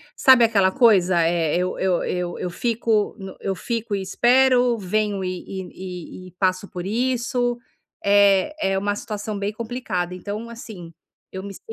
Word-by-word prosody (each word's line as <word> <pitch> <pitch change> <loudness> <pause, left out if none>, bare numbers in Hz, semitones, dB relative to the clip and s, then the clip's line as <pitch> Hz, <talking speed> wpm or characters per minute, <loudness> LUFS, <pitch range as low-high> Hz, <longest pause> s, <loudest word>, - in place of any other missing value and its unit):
sabe 260 -3 +6
aquela 200 -4 +3
coisa, 185 -6 +4
eh, 165 -2 +1
eu 180 +1 -1
eu 185 -2 +1
eu 180 -1 -3
eu 180 - -3
fico 225 +2 0
no 190 -1 -8
eu 195 -1 -2
fico 230 +2 -3
e 195 - -2
espero, 245 +3 +3
venho 205 0 -1
e 185 -1 -4
e 185 -1 -8
e - - -10
e - - -20
passo 185 0 +1
por 180 -3 -6
isso. 245 +2 0 0.5
É 200 +6 +4 0.2
é - - +1
uma 205 +1 -1
situação 210 0 -5
bem 200 +1 -2
complicada, 220 -6 -3
então 210 +5 -6
assim, 215 -8 -10 0.4
eu 190 0 -6
me 200 0 -7
si - - -12
200 Hz, 170 wpm, -22 LUFS, 185-230 Hz, 0.5 s, sabe